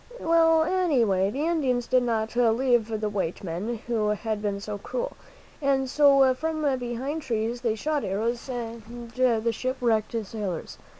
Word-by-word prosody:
Well, 325 -1 +4
any 335 -8 +2
way, 190 -1 +2
the 280 +8 -2
Indians 265 -8 +1
did 255 0 +3
not 225 -2 -1
love 230 -2 +3 0.4
the 215 - 0
white 195 -5 -3
men 200 +7 -4
who 225 -3 0
had 210 0 -2
been 200 -1 -2
so 205 0 -5
cruel, - - -4 0.5
and 270 -2 +2
so 275 -1 +5
from 310 +4 -3 0.2
behind 250 +6 -3
trees 235 -2 -2
they 230 -3 0
shot 295 +5 -1
arrows 230 +6 -2
at 235 -2 -5 0.3
the 235 -3 +2
ship 255 +4 -3
wrecked 225 -2 +1
sailors. 195 -5 -5
240 Hz, 160 wpm, -26 LUFS, 215-275 Hz, 0.5 s, so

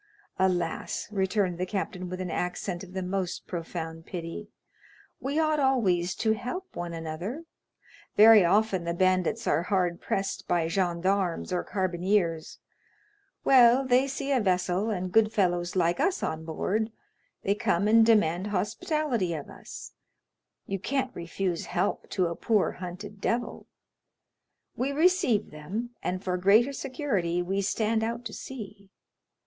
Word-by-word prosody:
"Alas," 180 -3 0
returned 190 -2 0
the 185 - 0
captain 185 -2 -3
with 185 +1 -5
an 185 -2 -3
accent 180 +1 -3
of 185 -1 -12
the 190 -1 -3
most 185 -1 -3
profound 165 -2 -5
pity, 175 +4 -6 0.7
"we 275 +3 -2
ought 310 -1 +2
always 195 -10 +2
to 220 - +1
help 250 - -6
one 175 -1 -4
another. 170 - -5 0.7
Very 215 -1 +9
often 195 0 +2
the 170 0 -2
bandits 185 +5 +1
are 150 - +2
hard 180 -2 0
pressed 195 0 -2
by 170 -2 +1
gendarmes 180 +1 0
or 180 - 0
carbineers; 180 -3 0 0.9
well, 255 0 +6
they 255 +1 +3
see 275 +1 -3
a 260 -3 +3
vessel, 185 +1 +1
and 185 -3 -2
good 220 +1 +4
fellows 175 -4 0
like 175 -1 +2
us 385 -1 +1
on 160 0 -3
board, 210 +7 -1 0.5
they 200 - +2
come 200 -1 +1
and 225 +1 +6
demand 205 -5 +3
hospitality 210 - -1
of 150 - -7
us; - - -10 0.7
you 195 0 -3
can't 265 +5 -2
refuse 175 +1 -3
help 180 +2 -1
to 185 -3 +1
a 170 0 -2
poor 215 +1 +1
hunted 195 +3 -8
devil; 235 +3 -2 1.1
we 265 +3 -1
receive 305 - +2
them, 190 +11 -5
and 185 +1 -3
for 180 -1 -1
greater 215 +9 +4
security 225 - -1
we 195 +3 -1
stand 220 +3 0
out 235 +2 -3
to 215 - -5
sea. 210 -6 -9
195 Hz, 145 wpm, -28 LUFS, 175-225 Hz, 1.1 s, Very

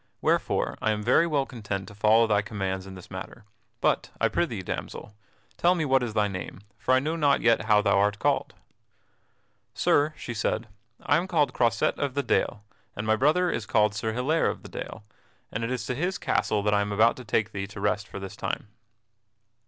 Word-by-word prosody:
Wherefore - - 0
I 110 - +1
am 105 0 -4
very 130 +9 +4
well 145 -4 +1
content 105 -6 -5
to - - -11
follow 110 +3 +4
thy 105 -2 +2
commands 95 -3 -4
in 95 - -9
this 90 0 -13
matter. 95 +4 -8 0.4
But - - +1
I - - +3
prithee, - - -1
damsel, 105 - -6 0.4
tell 175 +1 +4
me 160 -3 -1
what 135 -2 +3
is 115 -3 -3
thy 105 -1 +3
name, 95 0 -6 0.2
for 130 - +3
I - - +4
know 155 +5 -2
not 145 -4 +3
yet 115 -2 +3
how 105 -1 +4
thou 100 -1 +3
art 105 0 +2
called." 95 - 0 1.2
"Sir," 150 +2 +2
she 120 - -6
said, 115 +1 -1 0.4
"I - - +3
am 175 +3 -1
called 155 -6 +1
Croisette 115 -2 +1
of 140 -2 -2
the 140 - 0
Dale, 105 -5 0 0.3
and 105 - -4
my 110 0 +3
brother 155 +9 +3
is 105 - -3
called 105 -1 +3
Sir 110 +1 -2
Hilaire 130 +8 +1
of - - -6
the - - -10
Dale, 110 - -7 0.5
and 110 - -3
it 115 - -1
is 130 -1 -3
to - - -2
his 175 +9 -1
castle 105 -1 0
that 105 0 +2
I 100 - +3
am 100 0 -2
about 110 +3 +4
to 125 - -8
take 110 -1 0
thee 100 -1 -4
to 100 0 -10
rest 105 +1 0
for - - -7
this 95 -1 -7
time." - - -4
110 Hz, 215 wpm, -27 LUFS, 105-130 Hz, 1.2 s, very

